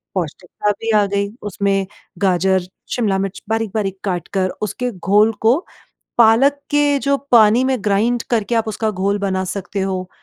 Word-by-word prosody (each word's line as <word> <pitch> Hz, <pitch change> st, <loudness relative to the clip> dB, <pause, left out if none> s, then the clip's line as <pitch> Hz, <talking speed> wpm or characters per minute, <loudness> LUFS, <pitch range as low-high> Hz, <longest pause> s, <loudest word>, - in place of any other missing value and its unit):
पौष्टिकता 180 Hz, +4 st, -2 dB
भी 225 Hz, 0 st, -1 dB
आ 205 Hz, -, +4 dB
गई 200 Hz, 0 st, -1 dB
उसमें 195 Hz, -1 st, 0 dB, 0.3 s
गाजर, 190 Hz, 0 st, +2 dB, 0.3 s
शिमला 210 Hz, -6 st, +1 dB
मिर्च 195 Hz, 0 st, -4 dB
बारीक-बारीक 215 Hz, -3 st, -1 dB
काट 180 Hz, -4 st, -2 dB
कर 190 Hz, -1 st, +1 dB
उसके 245 Hz, +4 st, -2 dB
घोल 205 Hz, +3 st, +2 dB
को 235 Hz, +7 st, +4 dB, 0.6 s
पालक 235 Hz, +5 st, +5 dB, 0.2 s
के 290 Hz, -1 st, +3 dB
जो 280 Hz, +1 st, +1 dB, 0.2 s
पानी 230 Hz, +1 st, +6 dB
में 260 Hz, 0 st, +1 dB
ग्राइन्ड 220 Hz, +4 st, +1 dB
करके 235 Hz, 0 st, 0 dB
आप 225 Hz, -1 st, +1 dB
उसका 220 Hz, 0 st, -1 dB
घोल 200 Hz, +1 st, 0 dB
बना 190 Hz, -2 st, -1 dB
सकते 195 Hz, +1 st, -4 dB
हो। 185 Hz, -1 st, -3 dB
205 Hz, 160 wpm, -19 LUFS, 190-225 Hz, 0.6 s, पानी